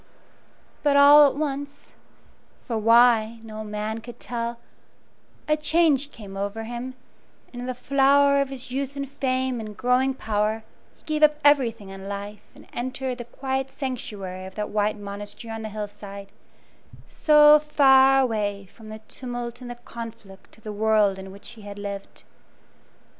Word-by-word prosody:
But 285 -1 +3
all 290 +1 +9
at - - -7
once 285 -1 -5 0.7
for 235 - -4
why, 230 0 +4
no 215 -1 -7
man 210 +1 -4
could 235 +1 -11
tell 235 0 -4 0.9
a 305 - +3
change 300 -2 +2
came 200 -4 -11
over 200 +3 -4
him, 240 +3 -6 0.6
and 245 - -7
in 250 - -5
the 255 - -3
flower 280 +2 +3
of 275 - -2
his 260 -2 -8
youth 275 +1 -3
and 280 0 -4
fame 260 -2 -1
and 215 -2 -8
growing 255 +1 +2
power 215 -1 -1 0.3
he - - -29
gave 310 -1 -2
up 300 -1 +5
everything 235 -8 +3
in 195 0 -8
life 200 +1 -6
and - - -15
entered 255 +1 -4
the 240 - -6
quiet 265 +2 -3
sanctuary 205 -9 -6
of 190 - -13
that 210 -1 -3
white 210 0 0
monastery 205 +2 -8
on 225 - -6
the 220 - -5
hill 210 0 -4
side, 200 -1 -11 0.8
so 300 -1 +6
far 270 -3 +5
away 205 -5 -2
from 220 -2 -13
the 215 0 -9
tumult 245 -1 -6
and 245 - -8
the 245 - -6
conflict 230 -5 -11
of 220 - -23
the 215 - -6
world 210 -2 +2
in 190 0 -9
which 200 +1 -12
he 230 -2 -13
had 205 0 -9
lived. 200 -1 -7
235 Hz, 165 wpm, -24 LUFS, 210-270 Hz, 0.9 s, all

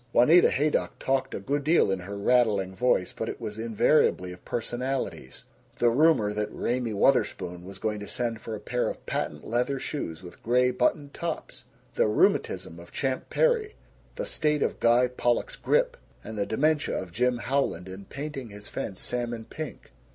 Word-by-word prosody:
Juanita 155 +9 +7
Haydock 150 +3 0
talked 135 0 0
a - - -3
good 140 +8 -1
deal 155 - +4
in 95 - 0
her 100 +3 -6
rattling 100 -4 +2
voice 125 -5 +1
but - - -4
it - - -6
was 105 +1 -6
invariably 110 -4 +2
of 90 - -12
personalities: 120 - -3 0.3
the 120 -1 +4
rumor 130 -6 +4
that 105 0 -2
Raymie 120 -1 -1
Wutherspoon 90 -6 +1
was 95 0 -9
going 105 +1 -2
to 105 - -7
send 115 -3 -2
for 110 - -5
a - - -7
pair 125 +4 -1
of - - -8
patent - - -3
leather 125 +4 0
shoes 90 - -4
with 90 - -12
gray 125 +2 +3
buttoned 140 +3 0
tops; 170 -2 -5 0.3
the - - +3
rheumatism 85 -5 +1
of 85 +1 -13
Champ 130 -2 -2
Perry; 465 -4 +2 0.4
the - - -3
state 150 -1 +1
of - - -2
Guy 120 +2 +4
Pollock's 125 - 0
grippe; - - +1 0.3
and 110 - -7
the 100 -1 -1
dementia 150 +5 +1
of 95 -2 -7
Jim 125 +6 +1
Howland 120 -9 -1
in 95 +1 -9
painting 140 -2 -6
his 105 0 -11
fence 95 -3 -5
salmon 120 -2 -3
pink. 155 +3 -8
120 Hz, 175 wpm, -27 LUFS, 100-140 Hz, 0.4 s, Juanita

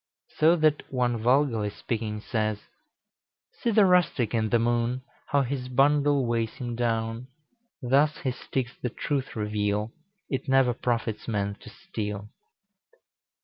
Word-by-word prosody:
So 160 +3 +6
that 155 -2 +1
one 125 -2 +1
vulgarly 120 -3 +2
speaking 105 0 -4
says, 110 -2 -1 1.0
"See 235 - 0
the 210 -2 +5
rustic 175 - +3
in 110 -2 +1
the 120 - +4
Moon, 120 +2 0 0.2
How 140 -1 +2
his 130 0 -4
bundle 140 +1 +3
weighs 115 -2 -1
him 120 -2 -4
down; 115 0 -1 0.6
Thus 140 +5 +3
his 130 -3 -2
sticks 125 0 -3
the 125 - -1
truth 135 +3 -3
reveal, 105 0 -1 0.4
It 135 -1 -3
never 135 -2 +4
profits 115 -3 -2
man 100 -3 -1
to - - -12
steal." 105 - -6
120 Hz, 135 wpm, -27 LUFS, 110-135 Hz, 1.0 s, So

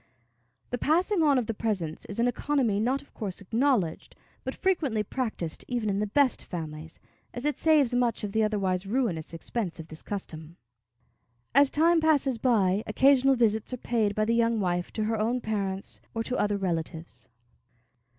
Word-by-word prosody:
The 245 - -2
passing 355 +5 +2
on 290 -3 +4
of 250 - +1
the 225 - -2
presents 195 -8 -3
is 205 - -6
an 235 - +3
economy 245 -4 0
not 255 +5 0
of - - -26
course 200 -5 -5
acknowledged, 220 - 0 0.3
but - - -4
frequently 295 - 0
practiced 215 -8 -4
even 235 -4 -1
in 195 - -1
the 210 - 0
best 270 +4 +2
families, 160 -2 -7 0.4
as 245 +3 -4
it 295 - +1
saves 300 -6 +3
much 245 -2 +1
of 205 - -3
the 220 - +1
otherwise 195 -3 0
ruinous 200 -9 -1
expense 170 +2 -4
of 160 0 -9
this 155 - -8
custom. 170 -5 -7 1.0
As 280 +2 +6
time 330 +3 +3
passes 285 -6 +2
by, 205 -6 +2
occasional 270 +3 +4
visits 220 -1 +1
are - - -2
paid 220 -4 0
by 215 - +1
the 230 - +1
young 230 -1 +2
wife 175 -2 -1
to 215 - -1
her 220 0 -1
own 235 +4 +1
parents 200 -4 -3
or 225 - -1
to 250 - -2
other 205 -3 +1
relatives. 165 - -4
220 Hz, 175 wpm, -28 LUFS, 190-255 Hz, 1.0 s, As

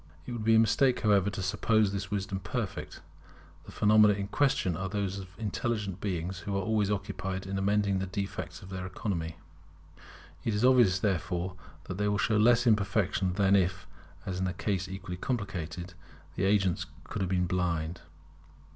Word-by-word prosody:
It - - -6
would 120 -2 -4
be 115 +1 +5
a - - +7
mistake, 125 +3 +3
however, 100 -3 +3
to 95 -1 -4
suppose 105 +3 +2
this 95 -2 -4
wisdom 100 -1 -2
perfect. 90 -3 -4 0.7
The - - -9
phenomena 105 -1 +5
in 100 0 -4
question 125 - +1
are 95 +3 -3
those 100 -1 -2
of 95 -1 -11
intelligent 105 -3 -2
beings 90 -2 -3
who 100 +3 -3
are - - 0
always 105 0 +1
occupied 95 -2 -3
in 95 0 -4
amending 100 0 +2
the 95 - -2
defects 100 +1 -5
of 95 - -10
their 90 -1 -5
economy. 85 -4 -3 1.1
It 110 - 0
is 105 +4 +2
obvious, 120 -8 +5
therefore, 90 -2 -1 0.3
that 90 - -6
they 105 - +1
will 105 0 +1
show 110 +1 +2
less 120 +3 +5
imperfection 100 -4 +2
than 100 0 +3
if, 90 -1 +1 0.4
in 95 0 -2
a 95 - -2
case 95 -2 -2
equally 95 -1 -6
complicated, 90 -6 -4 0.4
the 95 - 0
agents 95 -3 +2 0.2
could 105 - -5
have 95 - 0
been 90 -1 +1
blind. 85 -2 -1
95 Hz, 175 wpm, -30 LUFS, 90-105 Hz, 1.1 s, a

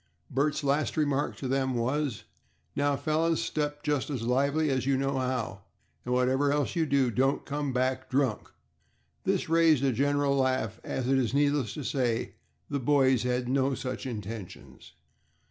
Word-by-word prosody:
Bert's 145 +3 0
last 140 +3 0
remark 145 -2 0
to 135 - -5
them 130 0 0
was, 130 +1 -1 0.5
"Now, 145 0 +2
fellows, 160 +3 +1
step 145 -1 -2
just 150 -3 0
as 130 -6 -3
lively 140 +5 +1
as 130 -1 -1
you 135 -1 +3
know 135 0 0
how, 125 -6 -2 0.4
and 125 - -4
whatever 130 +3 +2
else 145 -2 0
you 165 -2 +1
do, 135 -3 +2
don't 135 +4 +1
come 145 -1 -2
back 130 +1 -1
drunk." 130 -5 0 0.8
This - - 0
raised 165 -4 +4
a 135 - +3
general 140 +3 +1
laugh, 130 -5 0
as, 125 - -3
it 135 0 +3
is 125 0 0
needless 145 -6 +1
to 150 - -5
say, 125 -3 -1 0.3
the 140 - -2
boys 130 -2 +3
had 125 - 0
had 120 - -6
no 135 0 +1
such 130 +1 -5
intentions. 110 -4 -8
135 Hz, 165 wpm, -28 LUFS, 125-145 Hz, 0.8 s, raised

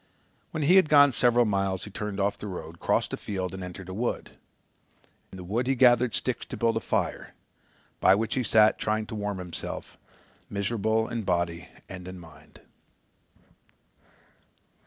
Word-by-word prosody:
When 155 - -3
he 175 +6 +6
had 185 -5 +5
gone 145 -1 +7
several 120 0 +3
miles 95 -3 -1
he 105 - -8
turned 105 0 -5
off 100 +1 +1
the 105 - -8
road, 85 -3 -7
crossed - - 0
a - - -2
field 95 -3 -4
and 95 - -6
entered 90 +1 -8
a 95 - -6
wood. 120 +5 -3 1.0
In 95 - -10
the 90 - -8
wood 115 +8 -2
he 135 - +2
gathered 120 -1 +4
sticks 130 - -2
to - - -6
build 115 -1 +1
a - - +1
fire, - - -2 0.6
by 95 - +6
which 110 +2 -1
he 130 - 0
sat 110 -1 +4
trying 110 0 -1
to 110 - -7
warm 105 -1 -3
himself, 90 -2 -7 0.5
miserable 110 +2 0
in 115 -1 -3
body 85 -4 -1 0.2
and 90 -1 -9
in 95 0 -8
mind. 80 -3 -16
105 Hz, 170 wpm, -27 LUFS, 95-115 Hz, 1.0 s, gone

